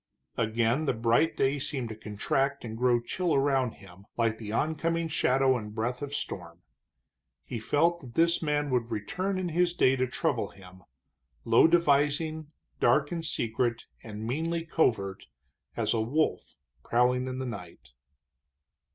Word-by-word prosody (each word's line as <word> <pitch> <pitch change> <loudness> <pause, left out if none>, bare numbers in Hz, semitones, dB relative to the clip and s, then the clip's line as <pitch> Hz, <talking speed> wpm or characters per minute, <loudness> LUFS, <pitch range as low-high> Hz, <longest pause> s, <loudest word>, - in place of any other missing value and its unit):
Again 115 +6 +1
the - - +1
bright 115 +8 +2
day 135 +2 +1
seemed 130 -4 -2
to 110 - -6
contract 120 +6 -1
and 110 -1 -6
grow 120 +1 +3
chill 165 +7 -1
around 135 -3 +2
him, 100 0 -16
like 115 -2 +1
the 105 -2 -6
oncoming 165 +6 0
shadow 135 -3 +2
and 105 -3 -6
breath 120 +3 -2
of 145 -1 -4
storm. 90 -10 -6 0.8
He 120 - -5
felt 165 +9 +2
that 125 -6 -12
this 170 +1 +3
man 145 -2 0
would 120 -2 0
return 185 - -2
in 185 -1 -2
his 175 +1 +1
day 130 -4 +4
to 130 0 +1
trouble 125 - -1
him, 95 -1 -15 0.6
low 115 +6 +6
devising, 155 -1 +2 0.3
dark 145 -1 +3
and 170 -2 -3
secret 120 -4 -1 0.2
and 110 -1 -7
meanly 165 +7 -2
covert 105 - 0 0.5
as - - +1
a 115 - +1
wolf 145 +8 -1 0.3
prowling 125 +2 +2
in 130 0 -4
the 130 - -3
night. 100 -8 -8
130 Hz, 150 wpm, -28 LUFS, 115-155 Hz, 0.8 s, low